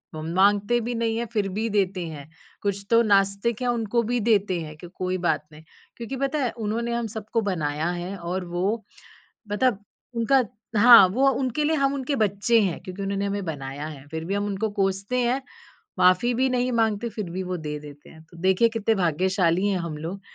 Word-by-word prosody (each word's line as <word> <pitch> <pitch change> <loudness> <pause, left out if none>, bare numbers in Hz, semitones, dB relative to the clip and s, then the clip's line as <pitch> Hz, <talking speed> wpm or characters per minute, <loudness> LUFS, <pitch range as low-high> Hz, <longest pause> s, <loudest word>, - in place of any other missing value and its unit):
वो 155 - -5
माँगते 205 +7 +3
भी 240 +2 -3
नहीं 230 -1 0
हैं, 235 - -1
फ़िर 210 -3 +1
भी 220 +4 -2
देते 195 -3 0
हैं। 150 -2 -9 0.3
कुछ 200 0 -2
तो 230 0 +6
नास्तिक 200 +2 +2
हैं, 250 - 0
उनको 235 -1 0
भी 245 - +1
देते 205 -5 +2
हैं 155 -1 -8
कि 175 - -10
कोई 185 0 -2
बात 160 -4 0
नहीं 155 +1 -14 0.3
क्योंकि 235 +3 -5
पता 275 +3 -1
है? 245 - 0
उन्होंने 230 +2 -3
हम 235 -1 -1
सबको 220 +1 -3
बनाया 160 -5 -1
है 175 +2 -4
और 180 +1 -4
वो 190 +6 -1 0.7
मतलब 210 -2 +1 0.3
उनका 250 +3 +3 0.3
हाँ, 235 -3 +9
वो 260 +9 +2
उनके 265 +3 -1
लिए 315 +1 +2
हम 275 -1 +1
उनके 275 +1 -2
बच्चे 215 +1 +2
हैं। 185 -4 -1
क्योंकि 185 +2 -7
उन्होंने 195 0 -1
हमें 200 0 -2
बनाया 145 -1 -5
है, 145 -3 -9
फ़िर 160 +1 -5
भी 195 - -1
हम 205 0 -1
उनको 205 +2 -2
कोसते 195 +5 0
हैं, 255 +3 0 0.6
माफ़ी 185 +7 +4
भी 260 +3 +2
नहीं 250 0 0
माँगते 225 -1 +1
फ़िर 210 -4 -5
भी 185 +2 -3
वो 180 0 -3
दे 150 -2 -5
देते 145 0 -13
हैं। 160 - -15
तो - - -15
देखिए, 190 +5 +4
कितने 225 -1 0
भाग्यशाली 180 +1 +1
हैं 195 -2 +1
हम 170 -3 -4
लोग, 170 +6 -6
200 Hz, 205 wpm, -25 LUFS, 180-230 Hz, 0.7 s, हाँ